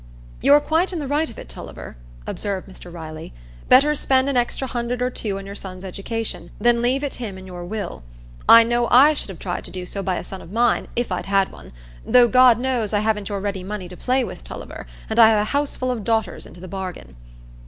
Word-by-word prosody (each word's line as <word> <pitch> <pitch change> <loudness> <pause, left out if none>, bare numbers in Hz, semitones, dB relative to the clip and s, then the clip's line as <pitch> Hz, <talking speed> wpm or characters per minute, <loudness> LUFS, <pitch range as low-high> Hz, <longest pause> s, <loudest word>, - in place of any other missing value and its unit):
"You're 290 +1 +7
quite 325 +5 +1
in 360 - -3
the 295 -3 -4
right 300 +3 0
of 230 - -13
it, - - -9
Tulliver," - - -9 0.3
observed 200 - -3
Mr 185 -2 -11
Riley. 160 - -8 0.4
"Better 285 +4 +6
spend 265 -2 +2
an 275 - -1
extra 245 +2 0
hundred 240 0 -3
or 250 0 0
two 205 -5 -3
on 195 - -7
your 200 - -7
son's 190 -2 -8
education, 220 +4 -4
than 240 0 +3
leave 255 +4 +1
it 285 - -2
him 205 -5 -5
in 190 - -10
your 180 -1 -8
will. 200 - -5 0.5
I 230 0 +10
know 240 +1 +1
I 275 +6 +7
should 290 - -3
have 190 - -8
tried 175 0 -4
to - - -8
do 185 -1 -6
so 200 +2 -5
by 190 -2 -1
a - - -4
son 190 - -8
of 165 - -12
mine, 235 +2 +2
if 240 -3 -1
I'd 180 - -3
had 195 -1 +2
one, - - -13 0.3
though, 245 -1 +6
God 250 -1 +6
knows, 240 -4 -1
I 205 - +2
haven't 215 -2 -1
your 200 -1 -2
ready 200 -2 -3
money 195 -1 -5
to 180 - -9
play 255 +6 +1
with, - - -7
Tulliver; - - -9 0.2
and 220 +1 -1
I 225 -1 +9
have 220 -1 +3
a 210 - -3
houseful 280 -3 -1
of 235 -4 -4
daughters 220 -4 -1
into 175 - -14
the 185 - -9
bargain." 180 - -7
220 Hz, 235 wpm, -22 LUFS, 190-250 Hz, 0.5 s, I